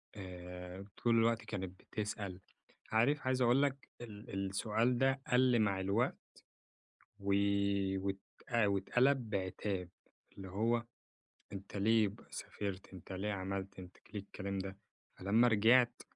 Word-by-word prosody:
آآ، 90 0 -8
طول 120 -1 +2
الوقت 115 +1 +2
كانت 95 -3 -5
بتسأل، 100 -3 -4 0.5
عارف 130 +7 +3
عايز 130 0 +2
أقول 125 +3 +5
لك 140 -1 -2
ال 105 -3 -5
السؤال 115 +5 +1
ده 135 +1 +2
قل 125 -1 +5
مع 100 -3 +2
الوقت 100 +6 +1 1.0
و 100 0 0 0.7
وت 95 0 -2 0.5
واتقلب 120 +5 +2
بعتاب. 95 -1 -2 0.5
اللي 95 -1 -7
هو 115 +4 +1 0.7
أنتَ 100 +1 -7
ليه 110 +1 +4
ب 100 - -9
سافرت؟ 100 -2 -5
أنتَ 95 +1 -10
ليه 100 +3 -2
عملت؟ 95 0 -4
أنتَ 90 -1 -11 0.2
ليه 105 - -2
الكلام 100 0 -5
ده. 95 +1 -5 0.4
فلمّا 110 +6 +4
رجعت 120 +3 +4
100 Hz, 125 wpm, -35 LUFS, 95-120 Hz, 1.0 s, أقول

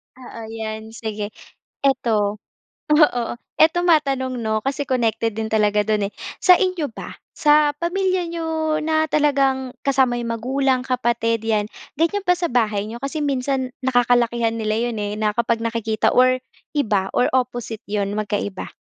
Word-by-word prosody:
Oo, 245 -2 -10
'yan 220 0 -6
sige. 215 -2 -4 0.5
Ito, 220 -7 +1 0.5
oo. 300 -6 +4 0.3
Ito 320 +2 +4
matanong 275 -6 +2
'no? 220 -3 -1
Kasi 275 +2 -1
connected 230 -4 0
din 220 - -1
talaga 210 -1 +2
do'n 210 -2 0
eh. - - -42 0.3
Sa 360 -1 +7
inyo 365 -7 -1
ba, - - -9 0.2
sa 300 0 +4
pamilya 370 +1 0
n'yo, 320 -2 -2
na 315 0 +1
talagang 275 -3 +1 0.2
kasama 260 -3 +2
yung 230 -1 -2
magulang, 260 +2 0
kapatid, 235 -3 0
'yan, 215 -1 0 0.2
ganyan 335 +7 0
ba 360 - +5
sa 350 -1 -2
bahay 215 -4 +1
niyo? 235 - -6
Kasi 275 +4 -4
minsan, 270 -2 -1
nakakalakihan 240 -2 +2
nila 215 -1 -1 0.2
'yon 225 - -5
eh, 205 0 -3
na 215 0 0
kapag 230 +1 0
nakikita 225 -1 0
or 255 0 +3 0.3
iba 210 -10 +1
or 245 - +2
opposite 245 -3 -2
'yon 200 -1 -1
magkaiba? 205 -2 -3
245 Hz, 150 wpm, -21 LUFS, 220-290 Hz, 0.5 s, Sa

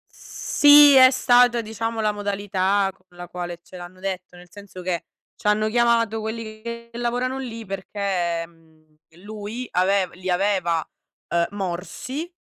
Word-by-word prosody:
Sì, 290 0 +6
è 260 -1 +9
stata 245 -2 +4
diciamo 225 +1 -4
la 215 -1 +1
modalità 200 -1 0
con 185 - -33
la 175 -1 -9
quale 175 -1 -6
ce 185 - -13
l'hanno 180 +1 -11
detto, 185 -2 -5
nel 175 0 -15
senso 200 -3 -11
che 175 -1 -3 0.3
ci - - -5
hanno 215 +1 +2
chiamato 230 -1 +2
quelli 220 0 -6
che 235 0 -7
lavorano 245 +2 -2
lì, 230 -4 -7
perché, 190 -3 -2
mhmm, 160 -2 -26 0.3
lui 215 +3 -6
avev 185 0 +1
li 185 +1 -6
aveva, 180 -3 +1 0.4
uhm, 170 0 +1
morsi. 205 - -5
205 Hz, 145 wpm, -23 LUFS, 180-230 Hz, 0.4 s, è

